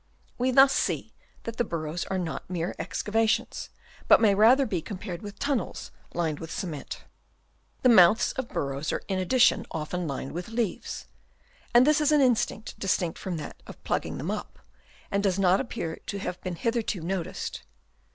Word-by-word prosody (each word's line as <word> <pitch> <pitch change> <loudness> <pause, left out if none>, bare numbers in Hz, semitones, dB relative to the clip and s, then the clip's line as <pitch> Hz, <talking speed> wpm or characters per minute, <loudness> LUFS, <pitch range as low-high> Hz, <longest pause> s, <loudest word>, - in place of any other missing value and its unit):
We 250 +1 +2
thus 270 +1 +7
see - - -1 0.3
that 230 0 -6
the - - +2
burrows 165 -3 -3
are 190 - -2
not 175 -2 -4
mere 175 -1 -2
excavations, 225 +1 0 0.4
but - - +8
may 215 -3 +5
rather 235 +7 +6
be 185 -8 -2
compared 185 -2 -6
with 205 -1 -8
tunnels 280 -4 -2 0.2
lined 160 -3 -1
with 165 - -7
cement. 160 -6 -5 0.8
The 255 - +6
mouths 210 -1 +6
of 260 -2 -4
the - - -19
burrow 140 0 -2
are - - -3
in 190 -2 -1
addition 245 +7 +3
often 165 +2 -3
lined 135 -1 -4
with 175 +2 -5
leaves; 225 -4 -3 0.7
and 240 +1 +7
this 300 +1 +4
is 300 0 +3
an 300 - +5
instinct 240 -4 +1
distinct 180 -3 0
from 180 -3 -3
that 150 - -8
of - - -12
plugging - - -2
them - - -3
up, - - -5 0.5
and 200 - +1
does 195 -2 +1
not 190 -1 +4
appear 225 -10 -4
to 200 - -3
have 180 -2 -5
been 185 -2 -4
hitherto 230 -1 -1
noticed. 180 +1 -3
195 Hz, 175 wpm, -27 LUFS, 175-235 Hz, 0.8 s, but